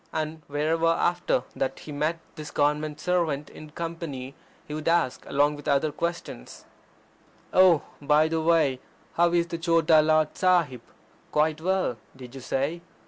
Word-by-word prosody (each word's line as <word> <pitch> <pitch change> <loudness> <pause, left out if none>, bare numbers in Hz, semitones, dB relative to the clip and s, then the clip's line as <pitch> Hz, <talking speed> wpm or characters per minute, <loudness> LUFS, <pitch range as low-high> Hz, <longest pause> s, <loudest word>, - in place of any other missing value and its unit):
And 155 0 -3
wherever 155 +3 0
after 170 -5 +1
that 135 0 -2
he 150 - -10
met 155 +3 -1 0.2
this 155 -2 -8
Government 150 +1 0
servant 165 -5 -1
in 155 - -11
company 160 -5 -6 0.3
he 150 - -6
would 155 0 -5
ask, 165 -6 +1
along 145 +1 +2
with 145 - -11
other 145 +1 +2
questions: 170 - -5 0.9
"Oh! 185 -4 +6 0.2
er 140 - -13
by 150 +1 +5
the 160 0 -1
way, 160 -5 +2 0.3
how 170 0 +3
is 170 -1 +2
the 170 -1 -6
Chota 165 -2 +4
Lord 155 0 +2
Sahib? 170 - +2 0.5
Quite 155 +1 +1
well, 185 -8 0 0.2
did 125 -2 -11
you 135 - -9
say? 140 +7 -2
155 Hz, 155 wpm, -26 LUFS, 145-170 Hz, 0.9 s, Oh